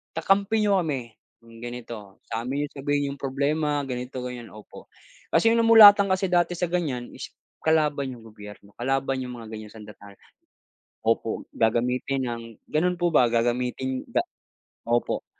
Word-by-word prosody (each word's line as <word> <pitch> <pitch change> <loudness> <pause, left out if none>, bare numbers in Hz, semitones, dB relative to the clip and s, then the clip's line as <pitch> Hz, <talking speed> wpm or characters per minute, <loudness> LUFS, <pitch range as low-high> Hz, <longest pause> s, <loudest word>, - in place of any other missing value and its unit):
kakampi 200 +6 +2
niyo 200 -2 +3
kami, 135 -9 -3 0.3
'yung 115 0 -15
ganito, 115 -4 -9
sa'min 125 +5 -2
niyo - - -3
sabihin 145 +1 -1
'yung 140 - -9
problema, 145 +2 0
ganito, 125 -1 -5
ganyan, 125 -2 -6
opo. 105 -1 -13 0.4
Kasi 225 - +3
'yung 230 - +3
namulatan 215 -3 +8
kasi 190 -1 0
dati 175 0 +2
sa 175 0 -2
ganiyan 140 -9 -2
is - - -8 0.3
kalaban 150 -4 +1
'yung 115 - -15
gobyerno, 105 -2 -13
kalaban 135 +1 0
'yung 125 - -7
mga 115 -1 -10
ganiyang 110 0 -9
sandatahan. 105 -2 -13 0.9
Opo, 115 0 0
gagamitin 125 +4 0
ng 120 -2 -4 0.3
ganun 180 +4 +1
po 175 0 0
ba, 125 -6 +5
gagamitin 125 +2 -1
ga - - 0 0.6
opo, 120 +1 0
130 Hz, 150 wpm, -25 LUFS, 115-160 Hz, 0.9 s, namulatan